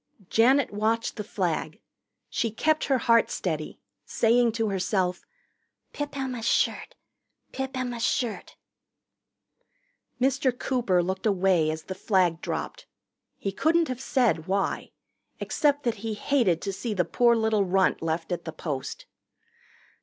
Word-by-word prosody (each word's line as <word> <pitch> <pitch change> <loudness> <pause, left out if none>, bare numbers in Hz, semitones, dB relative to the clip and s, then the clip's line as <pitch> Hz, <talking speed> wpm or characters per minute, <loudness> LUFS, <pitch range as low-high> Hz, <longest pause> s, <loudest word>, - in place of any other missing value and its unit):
Janet 255 +2 +4
watched 220 +2 0
the 210 - -4
flag. 185 -7 -2 0.5
She 230 - -1
kept 310 +8 +1
her 270 - +2
heart 230 -1 +3
steady, 155 -4 -3 0.2
saying 235 +1 +3
to 225 -1 0
herself, 185 -2 -1 0.7
"Pip 290 -1 -5
Emma's 250 -4 -3
shirt - - +1 0.6
Pip 265 0 -4
Emma's 245 -2 -3
shirt 240 -3 -1 0.8
" - - -47
Mr. 260 -1 +1
Cooper 235 -10 +1
looked 190 +4 -2
away 185 -5 +3
as 155 0 -4
the 190 - -5
flag 185 -3 +1
dropped. - - -5 0.5
He 195 - -3
couldn't 320 - +2
have 255 0 -4
said 240 - +1
why, 195 +1 -1 0.5
except 290 -1 +1
that 235 -2 0
he 220 -1 -3
hated 205 - +1
to 195 - -2
see 220 +2 -4
the 180 -3 +1
poor 235 +7 +3
little 220 -2 +2
runt 190 0 +2
left 165 +1 -2
at 175 -1 -2
the 160 - -4
post. 150 -4 -5
220 Hz, 140 wpm, -26 LUFS, 185-255 Hz, 0.8 s, Janet